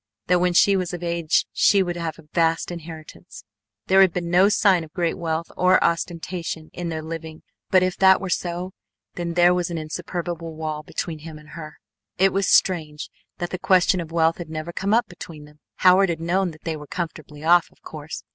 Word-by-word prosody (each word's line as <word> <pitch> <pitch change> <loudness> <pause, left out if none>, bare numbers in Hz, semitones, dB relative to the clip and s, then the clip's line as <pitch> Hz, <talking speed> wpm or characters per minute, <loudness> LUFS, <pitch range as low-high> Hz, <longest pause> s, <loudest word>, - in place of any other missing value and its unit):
That 180 -1 +3
when 180 0 +1
she 200 +3 +5
was 180 -2 -2
of 175 - -8
age 170 -2 +1
she 200 -2 +4
would 175 -1 -4
have 165 -2 -4
a 160 - -16
vast 165 +1 +1
inheritance. 165 +1 -10 0.4
There 190 +1 +5
had 190 -2 +5
been 170 -1 -3
no 185 +3 +5
sign 195 -5 +3
of 155 - -12
great 170 -2 -1
wealth 165 -1 -3
or 185 +1 +4
ostentation 170 -1 -3
in 175 -1 -4
their 160 -1 -4
living 160 0 -7 0.3
but 185 -1 +4
if 185 -1 -1
that 190 0 +6
were 195 - -5
so 175 +1 -3 0.4
then 170 -1 -4
there 175 0 +5
was 180 -1 -1
an 170 - -4
insuperable 165 +1 -5
wall 155 -1 -4
between 160 +1 -5
him 155 0 -10
and 150 0 -16
her. 155 -1 -9 0.4
It 195 +1 +3
was 195 -1 0
strange 155 -5 +1 0.3
that 175 - -4
the 185 - -4
question 185 0 +3
of 165 -1 -9
wealth 165 0 +2
had 170 -3 -7
never 160 +2 -6
come 195 +3 -2
up 235 -1 +2
between 165 -4 -10
them. 150 0 -19 0.2
Howard 185 +1 +5
had 165 -2 -2
known 180 +3 0
that 155 -1 -14
they 165 -1 -3
were 150 -1 -10
comfortably 155 -3 -6
off, 175 +1 +4
of - - -29
course. 155 0 -8
170 Hz, 210 wpm, -23 LUFS, 160-180 Hz, 0.4 s, that